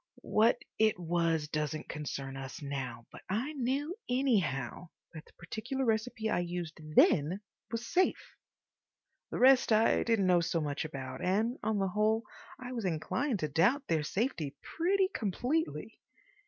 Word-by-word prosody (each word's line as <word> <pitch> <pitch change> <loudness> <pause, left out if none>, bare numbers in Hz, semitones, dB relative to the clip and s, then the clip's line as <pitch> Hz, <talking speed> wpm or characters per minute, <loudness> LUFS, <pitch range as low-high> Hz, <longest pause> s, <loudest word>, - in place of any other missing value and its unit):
What 220 +2 +4 0.2
it 215 -2 +4
was 165 -3 0
doesn't 155 0 -3
concern 140 -2 -5
us 135 0 -7
now, 130 -5 -5
but - - -11
I 235 +10 -1
knew, 280 +5 -1
anyhow, 180 - 0 0.2
that 160 -1 -9
the - - -21
particular 245 +9 -4
recipe 225 0 0
I 220 - +1
used 175 -2 -3 0.2
then 165 +7 +4 0.3
was 230 +1 -3
safe. 365 +10 0 0.9
The - - -4
rest 260 -1 +6
I 220 +1 +4
didn't 225 -4 +2
know 180 -1 +4
so 165 0 0
much 145 0 -2
about, 135 -4 -6
and, 215 +7 +1
on 220 -1 0
the 195 -1 +1
whole, 215 +3 +2 0.4
I 250 -1 -7
was 235 -3 -3
inclined 195 - -1
to 155 - 0
doubt 195 - +2
their 160 -2 +2
safety 160 - -2
pretty 375 +3 +1
completely. 250 - -2
200 Hz, 150 wpm, -32 LUFS, 155-245 Hz, 0.9 s, rest